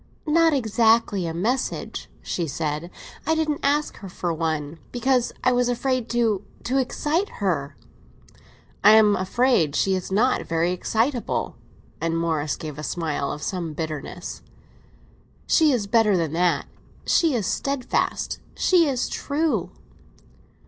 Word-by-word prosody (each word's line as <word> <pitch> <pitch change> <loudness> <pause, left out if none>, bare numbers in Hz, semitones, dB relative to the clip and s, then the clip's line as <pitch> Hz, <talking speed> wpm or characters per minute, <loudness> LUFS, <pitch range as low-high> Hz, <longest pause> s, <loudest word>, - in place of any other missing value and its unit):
"Not 325 +1 +4
exactly 225 - +2
a - - -2
message," 240 +9 -2
she 170 -2 -2
said; 155 +3 -3 0.4
"I 320 - +3
didn't 310 -2 0
ask 290 +2 +1
her 195 - -9
for 175 -1 -3
one, 160 -1 -2
because 250 0 +1
I 255 - +4
was 245 0 +2
afraid 250 0 -1
to—to 230 +2 -1
excite 300 +8 0
her." 145 -8 -1 1.1
"I 210 +2 +8
am 215 -2 +6
afraid 190 - +2
she 195 - +2
is 185 0 -3
not 240 +6 +2
very 165 +1 +1
excitable!" 230 +7 -1 0.5
And 165 0 0
Morris 160 -3 0
gave 150 -2 -7
a - - -6
smile 155 -4 -2
of 150 - -6
some 170 -4 -3
bitterness. 155 +2 -5 1.0
"She 315 -3 +4
is 240 -6 0
better 215 -2 +3
than 160 -3 -1
that. 175 +1 +1 0.4
She 325 -6 +3
is 220 -5 -1
steadfast—she 280 - 0
is 260 -3 0
true!" 280 - -1
210 Hz, 130 wpm, -24 LUFS, 165-255 Hz, 1.1 s, I